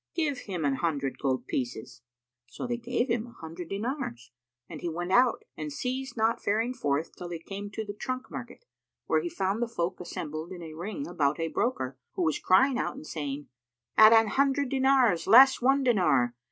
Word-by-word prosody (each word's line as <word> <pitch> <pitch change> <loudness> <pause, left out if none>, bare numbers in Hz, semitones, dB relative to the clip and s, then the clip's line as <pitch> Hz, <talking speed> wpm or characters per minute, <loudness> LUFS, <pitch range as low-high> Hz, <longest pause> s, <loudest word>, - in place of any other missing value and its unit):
Give 310 -4 0
him 180 -6 -4
an 135 -1 +1
hundred 140 -3 -2
gold 130 -3 -1
pieces." 120 -3 -4 0.5
So 120 - -7
they 240 -1 -2
gave 240 +1 -1
him 235 -1 -1
an 235 - -14
hundred 165 +1 -8
dinars, 205 - -4 0.4
and 155 -3 -9
he 175 - -2
went 175 +2 -4
out, 245 +3 +4
and 155 -1 -5
ceased 260 - -4
not 225 +1 +1
faring 225 +4 +1
forth 150 - -2
till 175 - -7
he 170 - -4
came 200 +5 -7
to 220 +2 -5
the 205 - -5
trunk 255 +5 -5
market, 265 - -8 0.4
where - - +2
he 345 - -3
found 205 - -1
the 240 - +1
folk 185 -6 -3
assembled 160 -1 -6
in 175 -2 -7
a 160 -1 -8
ring 210 - -5
about 145 - 0
a 165 0 -1
broker, 135 - -2
who 180 - -1
was 155 -3 +1
crying 240 +8 +4
out - - -2
and 285 +3 -10
saying, 145 - -5 0.5
"At 215 0 +9
an 225 -1 +6
hundred 275 +2 +1
dinars, 260 -9 +3
less 260 +6 +8
one 270 +2 +3
dinar! 150 - +3
200 Hz, 195 wpm, -28 LUFS, 160-250 Hz, 0.5 s, At